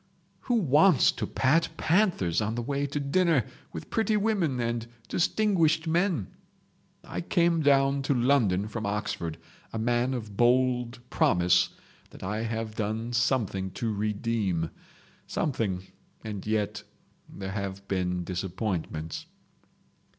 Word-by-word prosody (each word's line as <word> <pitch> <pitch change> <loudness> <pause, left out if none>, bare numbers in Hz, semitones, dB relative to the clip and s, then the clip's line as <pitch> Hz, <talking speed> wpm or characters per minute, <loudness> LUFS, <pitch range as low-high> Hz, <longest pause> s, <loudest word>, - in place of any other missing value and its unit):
Who 245 - +2
wants 160 - +5
to 110 -4 -4
pat 155 +6 +2
panthers 160 - +2
on 110 +1 -1
the 120 - -2
way 140 +2 -1
to 145 +1 -3
dinner 145 - +2 0.3
with 80 - -8
pretty 220 -1 +2
women 195 - +1
and 115 -1 -2 0.2
distinguished 170 -4 +2
men? 165 - 0 0.7
I 90 - -5
came 170 - +2
down 140 -1 +3
to 140 - +4
London 120 -7 +2
from 110 -1 -4
Oxford, 100 -5 -3 0.3
a - - -4
man 120 +3 +1
of 110 -4 -6
bold 125 0 +2
promise 90 0 +3 0.4
that - - -12
I 105 +4 -2
have 115 -1 -3
done 110 +2 -3
something 120 -6 +1
to 115 +1 -2
redeem. 105 -5 -1 0.6
Something—and 105 -3 -4
yet 110 -1 -1 0.5
there 95 -1 -6
have 100 -1 -5
been 90 -2 -1
disappointments 90 -3 -3
115 Hz, 120 wpm, -28 LUFS, 100-140 Hz, 0.7 s, wants